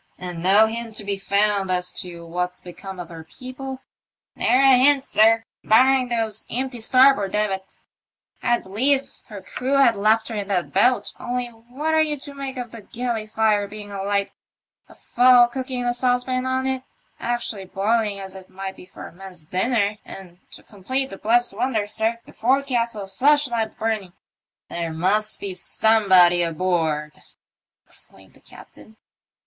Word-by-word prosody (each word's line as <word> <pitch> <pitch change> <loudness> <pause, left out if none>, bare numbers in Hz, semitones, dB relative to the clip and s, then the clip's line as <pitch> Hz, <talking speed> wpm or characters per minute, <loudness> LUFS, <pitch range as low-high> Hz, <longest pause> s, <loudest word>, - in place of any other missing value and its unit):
" - - -41
And 180 -2 -6
no 195 +5 +5
hint 225 0 -5
to - - -4
be 200 0 -2
found 200 0 +1
as 180 0 0
to 170 -2 -9
what's 180 +2 -3
become 185 +1 -10
of 175 -1 -7
her 165 -1 -10
people? 260 - -9 0.3
" - - -71
Ne'er 250 - +2
a 270 -1 +6
hint, 275 +1 +4
sir, 225 +1 +4 0.2
barring 255 +3 +4
those 225 -3 -1
empty 250 -1 -3
starboard 255 -5 +4
davits. 195 -2 -3 0.6
I'd 240 - +1
believe 265 +8 0
her 205 -3 -10
crew 265 +3 -2
had 275 -5 +5
left 215 +2 +2
her - - -5
in 205 -2 -4
that 185 -4 -2
boat, 240 +6 +2
only 245 0 -3
what 245 +7 -5
are 315 - +4
you 305 -1 0
to 285 - -8
make 275 -1 -6
of 245 -2 -6
the 230 - -9
galley 230 +1 -4
fire 215 -2 +1
being 205 0 -10
alight, 200 0 -1 0.6
a - - -16
fowl 245 0 +5
cooking 255 0 -4
in - - -3
a 240 - +1
saucepan 255 +1 0
on 260 0 -1
it 265 -1 -1 0.3
— - - -41
actually 235 -4 -3
boiling 205 +2 0
as 190 -1 -8
it 190 -1 -12
might 190 0 -7
be 180 - -14
for - - -11
a - - -10
man's 180 -2 -12
dinner 205 +4 0
— - - -41
and 180 -2 -12
to - - -12
complete 260 +7 -3
the 195 - -8
blessed 240 0 +3
wonder, 230 -2 -1
sir, 220 +2 -1
the - - -16
forecastle 240 -4 0
slush 290 +7 +3
lamp 225 -3 -3
burning! 215 -5 -2 0.2
" - - -71
" - - -72
There 170 -1 -3
must 195 +6 0
be 200 -2 -5
somebody 185 -3 +3
aboard," 160 -3 -1 0.6
exclaimed - - -13
the - - -21
captain. 220 0 -16
220 Hz, 180 wpm, -22 LUFS, 195-250 Hz, 0.6 s, a